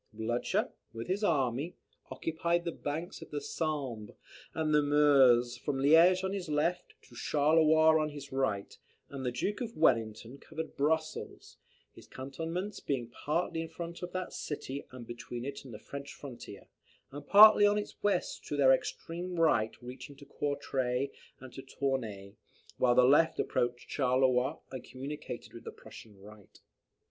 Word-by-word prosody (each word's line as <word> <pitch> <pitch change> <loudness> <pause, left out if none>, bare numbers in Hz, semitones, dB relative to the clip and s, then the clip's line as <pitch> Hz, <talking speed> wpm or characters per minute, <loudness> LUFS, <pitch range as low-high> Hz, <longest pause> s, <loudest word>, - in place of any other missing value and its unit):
Blucher, 110 +2 -1 0.2
with 115 0 -6
his 200 +3 -1
army, 140 - 0 0.3
occupied 170 +2 -1
the 170 - -1
banks 160 +3 -5
of - - -10
the 145 - -3
Sambre 140 -8 -4 0.4
and 155 -1 0
the 150 - +5
Meuse, 135 -5 +4
from 135 +2 -3
Liege 165 +7 +5
on 190 +1 -1
his 185 -5 -4
left, 170 +4 -1
to - - -19
Charleroi 155 +1 +4
on 155 - -1
his 145 -2 -9
right; 130 -7 -2 0.3
and 135 -2 -6
the 125 - -1
Duke 205 - -2
of 230 -2 -5
Wellington 115 -3 +1
covered 160 0 -7
Brussels; 155 +2 -2 0.4
his - - -15
cantonments 165 +9 -5
being 125 -4 -3
partly 165 +5 -2
in 165 - -6
front 170 0 -7
of 180 0 -5
that 185 -1 -4
city 140 -2 -5
and 125 -3 -10
between 120 +1 -7
it 140 0 -6
and 130 - -10
the 105 - -7
French 140 +6 -9
frontier, 120 -7 -10 0.5
and 145 +1 -9
partly 210 0 +9
on 205 0 +2
its 210 - -5
west 205 -3 -1
their 140 -2 +5
extreme 175 +6 -3
right 115 -9 +2
reaching 130 +3 -9
to 140 - -14
Courtray 135 -2 -2 0.3
and 130 -1 -12
Tournay, 115 -9 -3 0.5
while 120 -1 +4
the 125 - +6
left 145 +6 +4
approached 120 0 -1
Charleroi 130 +1 +2
and 130 -2 -6
communicated 140 +3 -7
with - - -10
the - - -7
Prussian 105 -3 -14
right. 105 0 -15
140 Hz, 155 wpm, -31 LUFS, 125-160 Hz, 0.5 s, partly